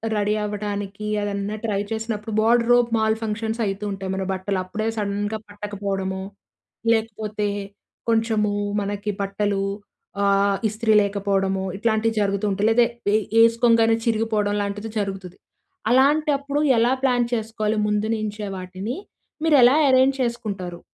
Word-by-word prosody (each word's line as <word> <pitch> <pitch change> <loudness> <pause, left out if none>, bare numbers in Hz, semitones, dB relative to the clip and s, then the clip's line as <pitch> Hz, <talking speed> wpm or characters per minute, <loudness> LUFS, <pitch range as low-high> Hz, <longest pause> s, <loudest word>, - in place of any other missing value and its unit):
Ready 210 0 +1
అవ్వటానికీ 205 0 -4 0.2
అదన్నా 205 +1 -2
try 210 -3 0
చేసినప్పుడు, 220 -1 -3
wardrobe 240 +1 +4
mall 220 0 +2
functions 220 +1 -3
అయితుంటాయి. 195 -1 -3
మన 190 0 -2
బట్టలు 185 0 -2
అప్పుడే 215 +4 -3
సడన్‌గా 205 +1 -2
పట్టకపోవడమో, 200 -2 -4 0.7
లేకపోతే 215 -2 -1 0.6
కొంచెము 225 -2 +1 0.3
మనకి 205 +1 -3
బట్టలూ 200 0 -1 0.6
ఆహ్, 200 0 +3
ఇస్త్రీ 220 +1 0
లేకపోడమో 195 -1 0
ఇట్లాంటివి 220 +1 0
జరుగుతుంటాయి, 200 +1 0
లేదా 235 +1 +5 0.3
ఏ - - +5 0.3
ఏసుకోంగానే 230 -1 +4
చిరిగిపోవడం 220 -2 +1
లాంటిది 205 +2 -4
జరుగుతుది. 190 -3 -5 0.5
అలాంటప్పుడు 285 +1 +2 0.2
ఎలా 235 +2 +3
ప్లాన్ 245 -2 +3
చేసుకోవాలి 220 -1 -1
ముందు 210 +1 0
నుంచే 210 -1 -4
వాటిని? 185 +6 -5 0.5
మీరు 320 -2 +4
ఎలా 250 +3 +7
ఎరేంజ్ 260 +1 +4
చేసుకుంటారు? 200 -7 -3
210 Hz, 115 wpm, -23 LUFS, 200-225 Hz, 0.7 s, ఎలా